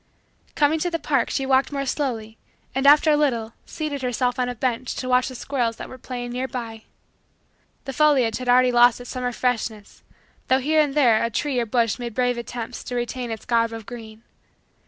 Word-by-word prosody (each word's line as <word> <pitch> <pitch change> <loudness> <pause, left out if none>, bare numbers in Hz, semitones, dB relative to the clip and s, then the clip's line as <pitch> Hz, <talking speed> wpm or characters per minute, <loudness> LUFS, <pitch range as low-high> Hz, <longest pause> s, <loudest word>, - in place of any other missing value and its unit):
Coming 305 +2 +2
to 355 - 0
the 335 - -1
park, 285 -5 0
she 270 - -1
walked 265 +1 +2
more 275 -1 -2
slowly 230 -6 -3 0.3
and, 270 +1 +1
after 300 +2 +7
a - - +5
little, 235 -7 0
seated 300 -3 -4
herself 250 0 -1
on 250 0 0
a 245 - -4
bench 245 +1 -2
to 255 - -4
watch 250 0 +3
the 260 - -7
squirrels 240 -3 -2
that - - -8
were 255 - -11
playing 245 -1 -6
nearby. 240 -3 -5 1.0
The 270 - -5
foliage 260 -6 +3
had 250 -1 -4
already 250 0 +5
lost 240 0 +5
its 245 - -9
summer 250 -1 -2
freshness 230 -4 -3 0.5
though 260 - +4
here 310 +4 +2
and 290 -2 -1
there 240 -7 +4
a 230 - 0
tree 260 +3 -1
or 235 - -1
bush 230 0 +1
made 235 -3 -5
brave 245 -1 +1
attempt 235 0 -6
to 250 - -4
retain 240 0 -3
its 225 -2 -6
garb 230 -1 +2
of 225 -2 -7
green. 225 -1 -10
250 Hz, 200 wpm, -23 LUFS, 235-270 Hz, 1.0 s, after